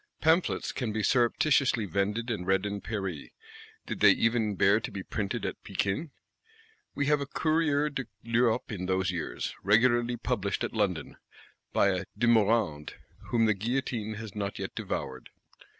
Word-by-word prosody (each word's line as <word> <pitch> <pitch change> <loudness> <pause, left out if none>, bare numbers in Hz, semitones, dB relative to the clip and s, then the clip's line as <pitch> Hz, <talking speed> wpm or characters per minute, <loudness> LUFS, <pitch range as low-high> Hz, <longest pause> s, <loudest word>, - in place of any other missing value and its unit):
Pamphlets 160 +3 +2
can 125 -5 -3
be 110 0 -2
surreptititiously 125 -1 +2
vended 105 +6 -1
and 95 -5 -4
read 95 +1 +2
in 100 -1 -3
Paris, 95 -7 -4 0.6
did - - -5
they - - +7
even 115 -3 +2
bear 100 +3 +4
to - - -5
be 95 - -6
"Printed 100 0 -3
at - - -5
Pekin." 100 - -2 0.9
We 140 - 0
have 150 0 +2
a 140 - -3
Courrier 155 -1 +1
de 135 -2 -3 0.2
l'Europe 115 +1 +1
in 90 -4 -4
those 95 0 +1
years, 85 -3 -4
regularly 120 +3 +3
published 105 -5 -2
at - - -3
London; 100 -7 -1 0.5
by 100 - +3
a 95 0 -1
De 120 - +1
Morande, 110 -9 +2 0.3
whom 115 -2 +3
the 110 - +4
guillotine 110 0 -2
has 110 -2 -7
not 100 -2 -3
yet - - -5
devoured. - - -5
110 Hz, 160 wpm, -29 LUFS, 100-120 Hz, 0.9 s, they